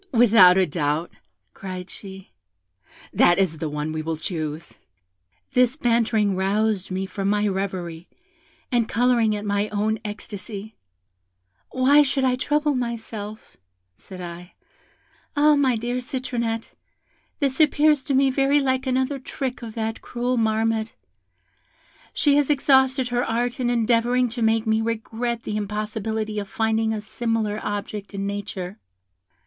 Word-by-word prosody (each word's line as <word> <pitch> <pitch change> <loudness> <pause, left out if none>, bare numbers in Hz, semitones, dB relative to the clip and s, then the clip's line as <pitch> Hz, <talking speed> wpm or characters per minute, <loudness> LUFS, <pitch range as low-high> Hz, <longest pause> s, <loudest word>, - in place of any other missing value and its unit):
'Without 220 -7 +7
a 190 - +4
doubt,' 155 0 -1 0.4
cried 185 -1 -7
she, 190 - -11 0.8
'that 175 - +5
is 180 -5 +1
the 160 - -2
one 150 +1 -3
we 155 0 -3
will 160 0 -3
choose.' 155 -1 -5 0.7
This 250 0 +3
bantering 230 -6 +2
roused 200 +1 0
me 190 +1 -2
from 195 +1 -3
my 210 0 +2
reverie, 185 -4 -4 0.6
and 240 -3 +1
colouring 235 -3 +2
at 210 0 -5
my 205 +1 0
own 215 +1 0
ecstasy, 210 0 -7 0.9
'Why 270 +3 +5
should 275 -1 +1
I 255 -1 +3
trouble 295 +3 +1
myself,' 225 -4 -5 0.4
said 185 - -11
I; 175 +1 -9 0.8
'ah, 295 +1 +5
my 270 -4 +3
dear 240 +2 -2
Citronette, 240 -3 -3 0.7
this 275 -2 0
appears 300 -2 +4
to 275 - 0
me 270 0 +4
very 275 +2 +3
like 260 -1 0
another 260 +2 0
trick 260 -1 -5
of 225 -2 -8
that 225 0 -3
cruel 245 +1 -2
Marmotte; 225 -1 0 1.2
she 285 -1 +3
has 290 -1 +2
exhausted 265 -2 +3
her 245 0 0
art 240 +2 -1
in 245 -1 +1
endeavouring 240 +1 +2
to 235 +1 -6
make 225 0 +2
me 220 0 +2
regret 230 +1 -3
the 210 - -3
impossibility 215 +1 -3
of 200 -1 -6
finding 220 0 0
a 215 -1 -2
similar 220 -1 -2
object 205 0 -5
in 195 0 -3
nature.' 200 -2 -5
220 Hz, 140 wpm, -23 LUFS, 200-250 Hz, 1.2 s, Without